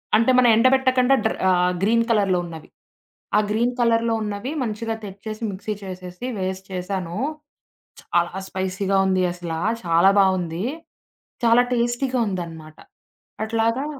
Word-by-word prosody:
అంటే, 230 +4 +4
మనం 250 -1 +6
ఎండబెట్టకుండా 255 +2 +4
డ్ర - - +2 0.2
ఆహ్, 180 0 +3
గ్రీన్ 230 +3 +3
కలర్‌లో 200 -5 +2
ఉన్నవి. 160 -2 -10 0.7
ఆ - - +6
గ్రీన్ 235 +3 +1
కలర్‌లో 230 -1 +2
ఉన్నవి 210 +5 -4
మంచిగా 225 0 -3
తెచ్చేసి 215 +3 -7
మిక్సీ 200 +3 -4
చేసేసి 185 +2 -8
వేసి 190 0 -3
చేశాను, 180 -1 -4 0.8
చాలా 175 +1 -1
స్పైసీగా 190 +1 -1
ఉంది 185 -1 +2
అసల, 175 -2 -6 0.3
చాలా 170 +3 +5
బావుంది. 185 -1 +1 0.8
చాలా 230 +1 +6
టేస్టీగా 240 +2 0
ఉందనమాట. 165 -5 -6 0.7
అట్లాగా 230 +4 0
200 Hz, 120 wpm, -22 LUFS, 180-230 Hz, 0.8 s, మనం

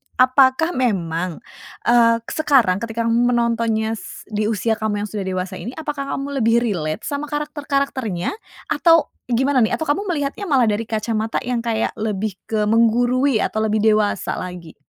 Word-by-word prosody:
apakah 260 +5 +4
memang, 180 -8 -1 0.5
eee, 230 -1 +5
sekarang 270 -12 +3
ketika 230 +1 -3
kamu 240 +2 +2
menontonnya 225 -2 0
s - - -10
di 210 -1 -1
usia 220 +1 0
kamu 210 -1 -1
yang 210 - -5
sudah 205 -3 -4
dewasa 185 0 -3
ini 245 - -6
apakah 295 -3 -4
kamu 280 0 -4
lebih 230 +1 +3
relate 160 -9 -2
sama 285 +1 -3
karakter-karakternya 280 - -2 0.4
atau 330 -2 +4 0.2
gimana 265 +3 +1
nih? 220 - 0
Atau 315 - -4
kamu 390 +8 0
melihatnya 295 +5 -2
malah 255 -7 +3
dari 215 +2 -1
kacamata 220 0 -2
yang 245 -1 -1
kayak 225 -1 0
lebih 210 -2 -2
ke 215 -1 0
menggurui 245 +2 +3
atau - - -3
lebih 215 -1 +1
dewasa 215 -2 +1
lagi? 180 -3 -8
230 Hz, 155 wpm, -20 LUFS, 215-270 Hz, 0.5 s, eee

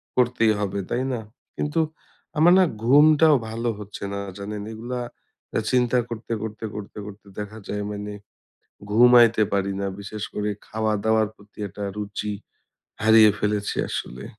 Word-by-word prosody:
করতেই 120 -3 +3
হবে, 100 -1 -2
তাই 125 +2 0
না? 115 - -3 0.3
কিন্তু 150 +3 -1 0.6
আমার 170 +3 +6
না 185 - +6 0.2
ঘুমটাও 150 +4 +6
ভালো 115 +1 -2
হচ্ছে 105 -1 -8
না, 100 - -3 0.2
জানেন? 105 +1 -5
এগুলা 120 +3 -5 0.6
এ - - +3
চিন্তা 125 -1 +3
করতে, 115 0 -5
করতে, 110 0 -5
করতে, 105 0 -8
করতে 105 0 -11
দেখা 105 +1 -6
যায় 105 0 -3
মানে 105 0 -5 0.8
ঘুমাইতে 120 0 +6
পারি 100 0 +1
না। 100 - -1
বিশেষ 100 +1 -7
করে 105 0 -1 0.2
খাওয়া-দাওয়ার 110 0 +1
প্রতি 105 0 -21
একটা 105 +2 -9
রুচি, 105 0 -4 0.7
হারিয়ে 110 -1 +7
ফেলেছি 105 -1 -1
আসলে। 60 +1 -5
110 Hz, 140 wpm, -24 LUFS, 105-120 Hz, 0.8 s, হারিয়ে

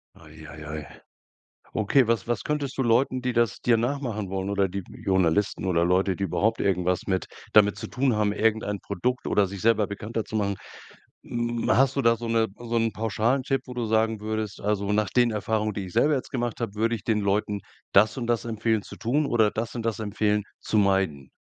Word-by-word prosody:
Ei, 80 0 -14
ei, 75 -1 -10
ei. 75 - -10 0.9
Okay, 110 +4 +3
was 115 -4 0
was 120 -3 -1
könntest 145 -3 -2
du 135 - +1
Leuten, 125 +2 +2
die 125 -1 0
das 120 -3 +1
dir 120 -2 +3
nachmachen 120 -5 -2
wollen 95 +1 -2
oder 100 -1 +2
die 100 +1 -4 0.2
Journalisten 95 +1 +1
oder 85 -2 +2
Leute, 95 +1 +2
die 100 - -3
überhaupt 110 +4 0
irgendwas 90 -1 0
mit 95 -1 0 0.3
damit 105 -1 +6
zu - - -6
tun 130 -2 +1
haben, 105 -1 +2
irgendein 105 -1 0
Produkt 125 +9 -2
oder 100 -2 +2
sich 95 -1 -7
selber 110 -2 +3
bekannter 110 +2 -4
zu 110 - -7
machen. 100 -2 0 0.7
Hm, 120 0 -2
hast 135 +2 +4
du 140 - +1
da 115 -1 +4
so 120 - -6
'ne 115 -1 +2
so 120 -1 -1
'nen 115 -1 +1
pauschalen 115 +4 0
Tipp, 135 0 0
wo 125 - -8
du 120 -1 -2
sagen 110 0 +1
würdest: 110 -1 -3
„Also, 100 -1 0
nach 105 -3 +1
den 120 -1 +3
Erfahrungen, 110 0 -1
die 100 - -3
ich 90 - -10
selber 150 - +3
jetzt 130 - -3
gemacht 120 -3 -3
habe, 110 -3 -3
würde 115 +2 +1
ich 110 - -7
den 110 -2 +1
Leuten 100 0 0 0.3
das 105 +2 +5
und 125 -3 -3
das 120 0 0
empfehlen 110 -1 0
zu - - -11
tun 140 +7 0
oder 110 -5 +3
das 115 +3 -4
und 115 - -3
das 115 -1 -1
empfehlen 105 0 0 0.2
zu 110 - 0
meiden?“ 95 -9 +1
110 Hz, 215 wpm, -26 LUFS, 100-120 Hz, 0.9 s, damit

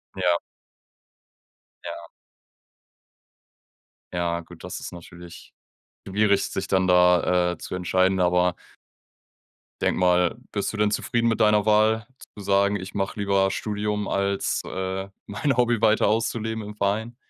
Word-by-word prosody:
Ja. 85 -1 +2 1.4
Ja. - - -8 2.0
Ja, 85 -1 -1
gut, 85 - -13
das - - -6
ist - - -7
natürlich 85 0 -12 0.5
schwierig, 100 0 +2
sich 95 0 -4
dann 95 -1 +2
da, 90 0 +4
äh, - - -10
zu - - -8
entscheiden, 95 +1 +1
aber 90 0 +2 1.3
denke - - +1
mal, 90 +2 +3 0.2
bist 100 +1 -2
du - - -5
denn 105 0 +2
zufrieden 115 +2 0
mit 115 -1 -1
deiner 105 -1 +4
Wahl 110 +1 +3 0.3
zu 100 - -8
sagen, 100 +1 +2
ich 95 -1 -6
mache 95 +1 -2
lieber 100 -1 +2
Studium 105 0 -2
als, 100 0 0
äh, 95 +1 -4 0.2
mein 130 +6 -1
Hobby 120 -2 +2
weiter 110 -2 +4
auszuleben 110 0 -1
im 105 0 -8
Verein? 105 +4 -1
100 Hz, 130 wpm, -24 LUFS, 90-105 Hz, 2.0 s, da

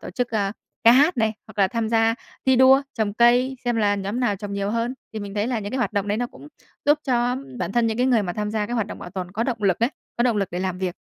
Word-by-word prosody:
tổ - - -7
chức, 245 +6 -2
a, 200 -3 0 0.3
ca 230 - +9
hát 290 +5 +4
này, 220 -2 +1
hoặc 215 -1 -15
là 195 -1 +4
tham 230 +1 -2
gia 225 0 +3 0.3
thi 260 -1 +5
đua 265 +2 +6
trồng 210 -3 -1
cây, 245 +3 +4
xem 240 -1 0
là 205 -2 +2
nhóm 205 +5 -3
nào 220 -5 +1
trồng 200 +1 -7
nhiều 200 0 -2
hơn. 230 +2 -1 0.2
Thì 220 - -4
mình 200 0 -7
thấy 210 +1 0
là 245 -2 -1
những 205 0 -5
cái 260 - -1
hoạt 245 - 0
động 205 -1 -1
đấy 205 +2 0
nó 245 - -1
cũng 295 - -14 0.4
giúp 295 +1 +4
cho 245 -1 +1 0.2
bản 180 +1 -3
thân 235 0 +2
những 220 -1 -1
cái 250 +2 +2
người 240 -4 +3
mà 180 -3 -3
tham 210 +2 -3
gia 210 -1 -1
cái 240 - -4
hoạt 225 -4 0
động - - -8
bảo 175 - -9
tồn 185 -1 -5
có 220 +3 -1
động 235 -5 -3
lực 190 -3 +2
ấy, 235 +3 +2 0.3
có 240 - +2
động 240 -3 +2
lực 195 -3 0
để 175 - -2
làm 185 -1 -2
việc. 185 -2 -3
225 Hz, 310 wpm, -23 LUFS, 200-245 Hz, 0.4 s, ca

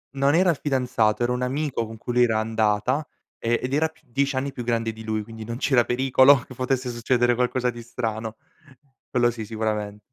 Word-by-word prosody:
Non 140 +3 +3
era 180 0 +4
il 160 - -3
fidanzato, 120 -5 +1
era 120 - +1
un 125 0 -1
amico 130 -2 -1
con 110 0 -9
cui 120 - -5
lei 125 0 +5
era 110 -2 +1
andata, 110 +5 +1 0.4
e 115 +1 +1
ed 130 +2 -2
era 160 +2 +3
più 160 - -23
10 135 +2 -1
anni 140 +2 -1
più 125 - -6
grande 115 -1 -1
di 110 +1 -10
lui, 110 -1 -2
quindi 115 0 -9
non 115 +2 -5
c'era 130 -3 +3
pericolo 130 +2 +5
che 130 - -12
potesse 130 0 -1
succedere 120 +1 +2
qualcosa 125 0 0
di 120 - -9
strano, 115 -2 -4 0.7
quello 120 -1 +2
sì 115 -1 -6
sicuramen 105 -1 -3
120 Hz, 205 wpm, -24 LUFS, 110-130 Hz, 0.7 s, lei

